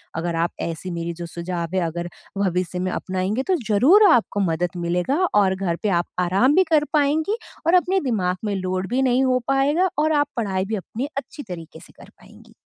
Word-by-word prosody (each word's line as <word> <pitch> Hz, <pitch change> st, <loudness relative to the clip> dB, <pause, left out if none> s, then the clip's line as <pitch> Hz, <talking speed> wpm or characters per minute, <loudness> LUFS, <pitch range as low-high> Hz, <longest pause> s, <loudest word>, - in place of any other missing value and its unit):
अगर 170 Hz, +1 st, -2 dB
आप 165 Hz, +1 st, 0 dB
ऐसी 170 Hz, +2 st, -4 dB
मेरी 170 Hz, 0 st, -3 dB
जो 170 Hz, +1 st, -7 dB
सुझाव 170 Hz, +1 st, -4 dB
है, 185 Hz, -, +2 dB
अगर 170 Hz, +1 st, -4 dB, 0.3 s
भविष्य 180 Hz, -2 st, -1 dB
में 185 Hz, 0 st, -1 dB
अपनाएँगे, 190 Hz, +8 st, -2 dB
तो 370 Hz, -, +1 dB
ज़रूर 295 Hz, -, +6 dB
आपको 230 Hz, -4 st, +2 dB
मदद 175 Hz, +2 st, -2 dB
मिलेगा 180 Hz, -, 0 dB, 0.2 s
और 195 Hz, -2 st, +3 dB
घर 185 Hz, -3 st, -1 dB
पे 210 Hz, -, +1 dB
आप -, -, -13 dB
आराम 195 Hz, +11 st, +3 dB
भी 375 Hz, -, +6 dB
कर 305 Hz, -2 st, +5 dB
पाएँगी 310 Hz, +8 st, +2 dB, 0.3 s
और 335 Hz, -, +4 dB
अपने 380 Hz, +2 st, 0 dB
दिमाग 185 Hz, -5 st, 0 dB
में 205 Hz, -1 st, -1 dB
लोड 185 Hz, 0 st, -2 dB
भी 250 Hz, +3 st, +1 dB
नहीं 260 Hz, 0 st, +3 dB
हो 255 Hz, -1 st, +2 dB
पाएगा 285 Hz, +7 st, +2 dB
और 310 Hz, +1 st, +2 dB
आप 290 Hz, -, 0 dB
पढ़ाई 195 Hz, -4 st, -1 dB
भी 220 Hz, +3 st, -2 dB
अपनी 220 Hz, +6 st, -5 dB
अच्छी 290 Hz, +1 st, -6 dB
तरीके 175 Hz, -6 st, -9 dB
से -, -, -16 dB
कर -, -, -14 dB
पाएँगी। -, -, -19 dB
195 Hz, 205 wpm, -22 LUFS, 180-270 Hz, 0.3 s, ज़रूर